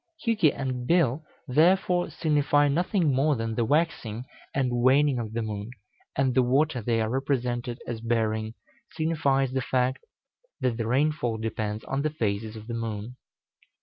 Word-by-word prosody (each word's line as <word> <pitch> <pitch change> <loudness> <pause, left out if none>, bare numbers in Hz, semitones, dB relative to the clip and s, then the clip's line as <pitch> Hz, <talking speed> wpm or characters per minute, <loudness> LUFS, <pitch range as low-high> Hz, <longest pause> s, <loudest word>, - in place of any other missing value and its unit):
Hjuki 210 -10 +4
and 130 -3 -4
Bil, 160 -4 +2 0.2
therefore, 175 +5 +3
signify 145 -2 +2
nothing 170 +1 +1
more 140 +3 +2
than 115 -1 -3
the 115 - 0
waxing 125 -5 0 0.3
and 125 -3 0
waning 135 +1 +4
of 110 -2 -5
the 115 0 -1
moon, 105 0 -5 0.5
and 135 -1 +2
the 130 - +4
water 130 +2 +2
they 115 +1 0
are 110 - 0
represented 125 -3 -1
as 115 -2 -5
bearing 110 -1 -1 0.4
signifies 140 -5 +1
the 130 0 -1
fact 130 +1 0 0.6
that 120 -3 0
the 115 -2 -2
rainfall 130 -2 +1
depends 110 -1 -3
on 135 +1 -2
the 155 - 0
phases 110 -6 -2
of 110 -1 -9
the 120 - -6
moon. 115 0 -4
125 Hz, 155 wpm, -27 LUFS, 115-145 Hz, 0.6 s, Hjuki